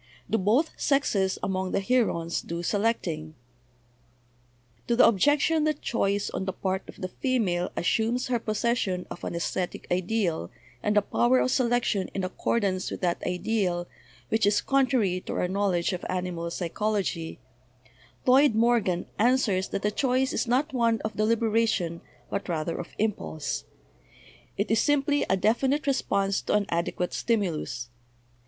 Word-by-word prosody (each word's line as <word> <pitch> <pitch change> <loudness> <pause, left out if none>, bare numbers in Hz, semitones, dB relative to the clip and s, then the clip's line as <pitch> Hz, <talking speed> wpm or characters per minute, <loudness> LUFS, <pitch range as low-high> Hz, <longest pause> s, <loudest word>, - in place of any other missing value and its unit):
Do 225 - +1
both 230 - +2
sexes 205 -9 +1
among} 190 -1 -1
the - - +2
herons 195 -7 +1
do 170 +1 -5
selecting?" 175 -7 -1 1.5
To 235 - +2
the 240 - +7
objection 290 - +3
that 305 -1 -1
choice 205 -3 0
on 190 - -3
the 190 - -2
part 190 0 -2
of - - -11
the 185 - -2
female 190 -9 0
assumes 230 +7 +1
her 245 -2 0
possession 215 -4 -1
of - - -8
an - - -3
esthetic 175 +1 -3
ideal 180 - 0 0.3
and 210 0 +1
a 205 - +5
power 120 - +3
of 125 0 +2
selection 240 -5 +1
in 195 - -1
accordance 185 0 -1
with - - -6
that 175 -2 0
ideal 180 -1 -1 0.4
which 220 -2 +2
is 205 0 +3
con 275 -1 +2
trary 200 -9 +1
to - - -4
our - - 0
knowledge 185 -2 0
of 180 - -5
animal 180 -2 -2
psychology, 185 -1 -2 0.9
Lloyd 260 -1 +5
Mor 235 +2 +4
gan 180 -4 -2
answers 220 -5 +2
that - - -4
the 210 - +1
choice 260 +3 +1
is - - -1
not 270 +5 +1
one 230 -3 +2
of 215 -1 -4
deliberation 220 -5 +1 0.3
but 200 -1 -3
rather 165 0 -2
of 175 - -5
impulse; 155 - -2 0.9
it 200 - -1
is 225 - +4
simply 290 +1 +2
a 190 - +3
definite 265 +9 +1
response 200 -8 +1
to - - 0
an 210 -1 +2
adequate 170 +1 -1
stimulus. 170 - -1
205 Hz, 150 wpm, -27 LUFS, 180-235 Hz, 1.5 s, the